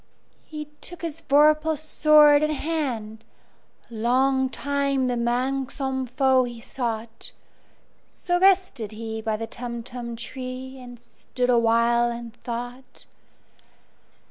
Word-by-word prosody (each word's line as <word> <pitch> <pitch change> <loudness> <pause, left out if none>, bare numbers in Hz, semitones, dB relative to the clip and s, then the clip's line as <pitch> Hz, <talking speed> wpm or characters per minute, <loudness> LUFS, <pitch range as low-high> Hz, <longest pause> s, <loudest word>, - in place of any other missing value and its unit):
He 305 -1 -6 0.2
took 350 -1 -8
his 330 -1 -4
vorpal 305 +2 +4
sword 305 -1 +5
in 305 - +1
hand:Long 260 -2 -2
time 280 -1 -1
the 250 -1 0
manxome 260 +2 -1
foe 260 +1 +3
he 240 -1 -6
sought—So 235 +8 -6
rested 370 - +2
he 220 0 -5
by 220 -1 -1
the 225 - -4
Tumtum 235 0 -6
tree, 255 +2 -7
And 245 -1 -11
stood 245 +1 -3
awhile 235 0 +3
in 235 -1 -7
thought. 245 +2 -8
255 Hz, 100 wpm, -24 LUFS, 235-285 Hz, 0.2 s, sword